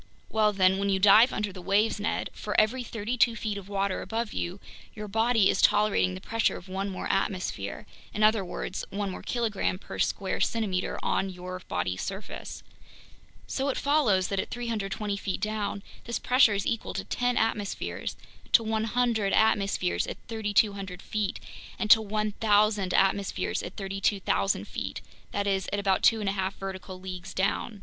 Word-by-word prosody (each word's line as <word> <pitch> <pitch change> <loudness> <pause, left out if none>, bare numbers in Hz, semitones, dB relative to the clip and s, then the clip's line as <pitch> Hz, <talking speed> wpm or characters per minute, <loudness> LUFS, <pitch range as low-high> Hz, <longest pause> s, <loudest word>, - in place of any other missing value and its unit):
Well 215 -1 +3
then, 190 -1 +3
when 200 0 0
you 195 - +3
dive 210 +6 +7
under 210 -2 -2
the 185 - -9
waves, 205 +4 +2
Ned, 205 - -2
for 210 - 0
every 225 +4 +2
thirty 230 +1 -4
two 230 0 +4
feet 215 -3 -3
of 200 -1 -8
water 195 -1 -1
above 230 -1 -3
you, 175 +3 -3 0.4
your 210 0 -6
body 225 0 +3
is - - +2
tolerating 205 - +3
the - - -6
pressure 225 -1 0
of 175 - -12
one 195 +2 -3
more 185 - -5
atmosphere, 185 -3 -2 0.3
in 215 - -1
other 215 -1 +4
words, 185 +1 -5
one 200 -1 -3
more - - -7
kilogram 220 -6 -1
per - - -9
each - - +3
square 195 -2 -3
centimeter 200 -5 0
on 195 - 0
your 185 0 -7
body's 90 +1 -2
surface. 195 +1 -6 0.8
So 275 +1 -1
it 270 - -1
follows 255 -11 +2
that 195 - -1
at - - -2
320 210 -3 -3
feet 195 -2 -3
down, 210 -1 -2 0.2
this 235 -1 -2
pressure 250 -4 +4
is 195 - -1
equal 230 -2 -2
to - - -2
ten 245 0 0
atmospheres, 215 -3 -2 0.4
to 230 - +7
100 220 -1 0
atmospheres 195 - +2
at - - -5
3,200 205 -4 0
feet, 210 0 -2 0.4
and 215 - +1
to 220 - +9
1,000 210 -1 +1
atmospheres 195 0 +1
at 175 - -7
32,000 195 - 0
feet, - - -5 0.3
that 200 0 -1
is, 195 -2 0
at 205 - 0
about 195 -2 +1
two 225 - +5
and 200 - 0
a - - -1
half 190 0 -2
vertical 190 -1 -7
leagues 185 -1 -7
down. 200 +2 -1
205 Hz, 175 wpm, -28 LUFS, 190-220 Hz, 0.8 s, to